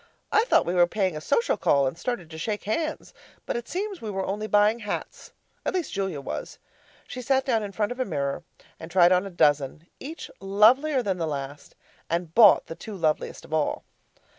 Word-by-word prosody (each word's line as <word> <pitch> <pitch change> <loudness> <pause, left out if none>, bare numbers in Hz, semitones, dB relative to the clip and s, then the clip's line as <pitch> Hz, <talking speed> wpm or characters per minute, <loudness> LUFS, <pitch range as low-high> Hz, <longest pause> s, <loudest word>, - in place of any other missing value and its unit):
I 435 - +4
thought - - +3
we 175 - -1
were 175 -1 +5
paying 190 -3 -1
a 155 - -5
social 465 - +1
call, 140 -1 +3
and 130 - -2
started 185 -5 -4
to 160 - -8
shake 210 +4 -3
hands, 310 +9 -3 0.3
but - - -3
it 235 0 -4
seems 395 0 -4
we 220 - -5
were 195 -1 -2
only 210 +3 -3
buying 210 +2 +3
hats 205 -2 -6 0.3
at - - -2
least 360 -3 -2
Julia 190 -6 -2
was. 140 - -6 0.5
She 250 - -6
sat 265 +2 +1
down 235 -5 +1
in 205 -1 -5
front 210 +2 -1
of 245 - -6
a - - +2
mirror 140 - -2 0.4
and 165 - -9
tried 175 0 +5
on 185 +2 +3
a - - -6
dozen, 150 -3 +1
each 305 +3 -8
lovelier 245 +8 +4
than 190 -4 -1
the 165 - -1
last, 145 -1 -6 0.3
and 170 -1 -2
bought 215 -2 +7
the - - -7
two 210 +5 -9
loveliest 155 -3 -1
of - - -10
all. 155 -2 0
195 Hz, 210 wpm, -26 LUFS, 165-240 Hz, 0.5 s, bought